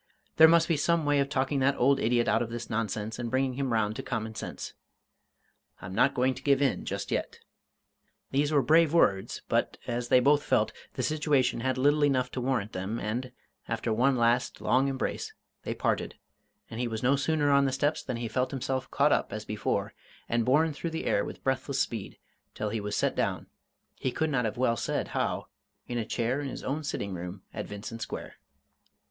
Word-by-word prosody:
There 160 - +10
must 165 0 +5
be 165 - +2
some 165 +1 +2
way 145 -1 +3
of 140 0 +1
talking 135 0 0
that 135 +1 +2
old 135 +2 +4
idiot 120 0 +2
out - - +3
of 120 - -2
this 120 0 -6
nonsense 110 0 -2
and 120 -1 -3
bringing 130 +1 +1
him 135 0 -2
round 110 -2 +1
to - - -3
common 110 -1 -3
sense. - - -6 1.1
I'm 95 +2 -8
not 135 +7 +3
going 130 +1 +2
to - - -10
give 140 -2 +3
in 140 -2 +1
just - - -4
yet!" - - -2 0.9
These 145 +2 +1
were 145 -3 +3
brave 160 +4 +4
words 95 - +2
but, - - 0
as 120 0 -2
they 125 - +6
both 145 +3 +4
felt, - - +1 0.2
the - - -2
situation 150 -5 +1
had 130 +2 -1
little 145 +3 +3
enough 130 -3 +2
to 130 - -3
warrant 125 -5 -1
them, 95 +5 -3
and, 125 +4 -3 0.4
after 115 0 -1
one 130 +4 +3
last 120 +1 +1
long 130 +2 +2
embrace, 135 -1 -3 0.3
they - - -4
parted, - - -1 0.5
and 115 - -7
he 125 - 0
was 110 0 -4
no 130 +3 +4
sooner 145 +1 +1
on 140 0 +5
the 135 - +1
steps 145 +4 0
than 125 -3 -4
he 115 0 -3
felt 125 +3 0
himself 130 -1 -3
caught - - +3
up - - +1
as - - -5
before - - -2 0.3
and 115 -1 +1
borne 150 +4 +3
through 165 +4 -4
the 160 0 -4
air - - +2
with - - -8
breathless 135 +1 -1
speed, 115 -7 -3 0.4
till 105 - -2
he 110 0 -2
was 105 0 -3
set - - +1
down, - - -1 0.5
he 130 - -1
could 160 +4 -1
not 125 -4 +1
have 110 - -3
well 120 -2 +2
said - - -2
how, - - -1 0.4
in 120 -1 -2
a 110 - -2
chair 120 +5 -1
in 140 - -4
his - - -7
own 145 +4 -2
sitting 100 -8 -3
room 90 +2 -6
at - - -5
Vincent 110 +3 -7
Square. - - -6
130 Hz, 210 wpm, -29 LUFS, 115-140 Hz, 1.1 s, There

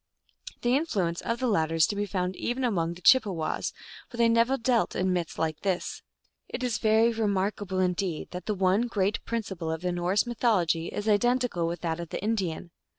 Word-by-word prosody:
The 245 +1 +3
influence 195 - 0
of 230 - -2
the 255 - -2
latter 165 -8 +1
is 160 -1 +5
to 205 - -3
be 205 0 -1
found 185 -1 -2
even 245 +6 -2
among 170 -8 0
the 180 - -14
Chippewas, 195 -11 +3 0.4
but 240 - -10
they 235 0 +4
never 230 +4 +3
dealt 235 -1 +1
in 185 0 +1
myths 175 -2 -3
like 160 -1 -1
this. 190 -3 -2 0.5
It 255 - -4
is 245 -3 0
very 220 +2 +4
remarkable 200 -2 -1
indeed 180 -2 -1
that 180 -1 -7
the 210 - 0
one 190 +5 +2
great 205 -3 -1
principle 190 -8 -3
of 160 0 -3
the 180 0 -1
Norse 175 +5 +1
mythology 190 -9 +1
is 205 - -4
identical 235 -4 +2
with 170 0 -4
that 165 -1 -2
of 170 -1 -6
the - - -4
Indian. 190 -6 -2
195 Hz, 195 wpm, -27 LUFS, 175-230 Hz, 0.5 s, is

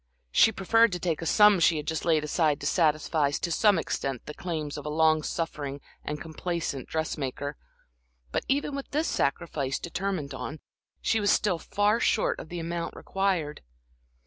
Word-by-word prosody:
She 220 - +6
preferred 225 +3 +3
to 180 - -2
take 170 -3 -1
a 165 - -3
sum 210 +2 +6
she 165 -1 +4
had 150 - -4
just 160 -1 -2
laid 160 -3 +3
aside 150 -1 +1
to - - -5
satisfy 155 -2 +2
to 170 +4 -2
some 205 +2 +4
extent 135 -5 -3
the 150 - -7
claims 155 -5 -4
of 145 - -6
a 150 - -4
long 155 0 +3
suffering 150 -4 -3 0.2
and 150 0 -4
complaisant 160 -4 -4
dressmaker; 145 -2 -3 0.8
but - - -1
even 285 +1 0
with 275 - -6
this 305 +3 0
sacrifice 140 -2 -1
determined 175 -4 -3
on, 155 - -6 0.4
she 225 - +2
was 205 -1 +1
still 190 -4 +2
far 205 +6 +1
short 220 - +1
of - - -9
the 175 - -5
amount 170 +1 -4
required. 185 -6 -1
165 Hz, 170 wpm, -28 LUFS, 150-190 Hz, 0.8 s, She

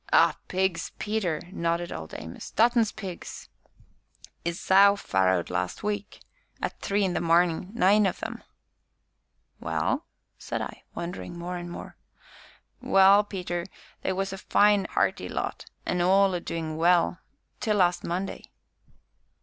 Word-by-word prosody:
"Ah! - - +5
pigs, 190 -2 -1
Peter," 205 -7 -1
nodded 170 -1 -1
Old 80 0 -7
Amos, 80 +1 -8
"Dutton's 230 -1 +3
pigs; 185 -4 -8 0.9
'is 170 +1 -2
sow 200 +1 +6
farrowed 95 - +1
last 90 0 -2
week 205 0 -3 0.4
at - - -4
three 200 +1 0
in 185 - 0
the - - -1
marnin' 170 +1 +2
nine 205 +1 +5
of 185 - -4
'em!" - - -5 1.2
"Well?" - - -1 0.3
said - - -4
I, - - -7
wondering 175 0 -6
more 175 +1 -4
and 175 0 -6
more. 175 - -9 0.8
"Well, 195 +2 +6
Peter, 180 -3 -4 0.3
they - - -1
was 195 +1 -2
a 195 - -6
fine 205 0 +3
'earty - - +1
lot, - - -4 0.2
an' 180 - 0
all 190 +2 +4
a 175 - 0
doin' 160 -2 -4
well 175 +1 +3 0.4
till 215 -2 +1
last 180 -2 +2
Monday." 185 +3 -3
180 Hz, 135 wpm, -27 LUFS, 170-200 Hz, 1.2 s, sow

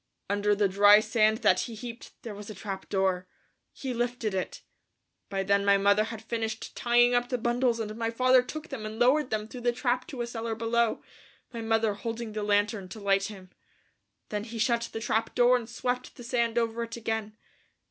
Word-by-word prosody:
Under 205 0 +2
the 205 0 +3
dry 205 +2 +7
sand 220 +1 +2
that - - +5
he 235 - -4
heaped 235 +1 -8
up - - -21
there 225 - -6
was 205 +1 -9
a 215 - -7
trap 195 -3 -6
door. 190 -2 0 0.4
He 265 -2 -5
lifted 240 -3 -2
it. 185 -1 -4 0.7
By 195 -1 -1
then 200 +1 +2
my 200 0 +5
mother 200 +2 +3
had 225 -1 -7
finished 225 -1 -4
tying 240 0 +4
up 245 0 +1
the 250 - 0
bundles 240 0 +1
and 215 -1 -4
my 225 0 -1
father 255 +2 +4
took 310 +6 -7
them 265 -6 -6
and 215 +1 -6
lowered 255 +4 +3
them 215 -1 -2
through 245 +2 -9
the 240 0 +2
trap 250 +1 -1
to 250 -4 -4
a - - -2
cellar 230 -1 -4
below, 230 0 0 0.5
my 230 - -4
mother 225 -1 +1
holding 225 +2 -5
the 215 - -3
lantern 205 -1 +1
to 215 - -8
light 195 -1 +2
him. 190 -4 -9 0.8
Then 210 0 -3
he 230 0 -7
shut 235 0 +1
the 225 - -5
trap 220 0 -1
door 245 0 +5
and 240 -2 -3
swept 250 +1 -3
the 245 - -10
sand 235 -1 0
over 230 0 0
it 230 0 -5
again. 220 -1 -3
225 Hz, 210 wpm, -28 LUFS, 210-240 Hz, 0.8 s, dry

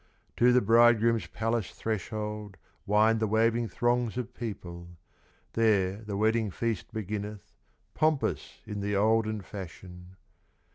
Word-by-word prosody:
To 125 +1 +5
the 125 0 +5
bridegroom's 115 -2 +4
palace 115 +2 -2
threshold, 105 -1 -4 0.3
Wind 110 +2 +4
the 110 - +1
waving 115 +2 +2
throngs 120 +3 0
of 125 0 -4
people; 85 -8 -7 0.7
There 100 -4 +2
the 105 -2 -5
wedding 110 +1 +2
feast 115 +1 -3
beginneth, 105 0 -5 0.4
Pompous 155 -2 0
in 105 -1 -5
the 100 0 -1
olden 110 +1 +2
fashion. 90 -1 -10
110 Hz, 115 wpm, -29 LUFS, 100-115 Hz, 0.7 s, To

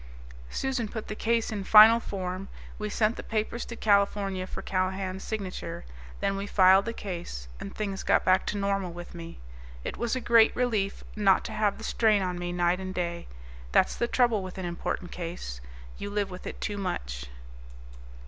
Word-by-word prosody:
Susan 260 - -1
put 220 +1 -6
the 215 - -3
case 230 +1 0
in 205 -2 -3
final 220 +3 +9
form. 185 -3 -4 0.3
We 210 0 -2
sent 215 +2 +1
the - - -4
papers 220 +2 -2
to 235 - -7
California 200 -3 +1
for - - -7
Callahan's 190 0 -2
signature, 195 - -5 0.4
then 195 - +1
we 200 +1 -4
filed 190 0 +6
the 230 - -2
case, 170 - -6
and 100 - -7
things 200 -2 -3
got - - +2
back 185 0 +3
to 210 - -1
normal 195 -2 0
with 175 0 -9
me. 170 -1 -8 0.5
It - - -4
was 235 +1 -1
a - - -1
great 230 -2 +5
relief 215 -6 0
not 200 -3 +4
to - - -4
have 215 -2 +1
the 225 - -10
strain 215 -3 +3
on 180 -1 -2
me 175 0 -3
night 175 +1 +1
and 185 0 -5
day. 170 -1 -3 0.5
That's - - +4
the 235 - 0
trouble 240 -4 +2
with 185 0 -7
an 190 - -4
important 175 0 -3
case. 165 - -6 0.4
You 200 - -4
live 205 -1 -1
with 180 - -8
it - - -6
too 205 -1 -3
much. - - -4
195 Hz, 185 wpm, -28 LUFS, 180-215 Hz, 0.5 s, final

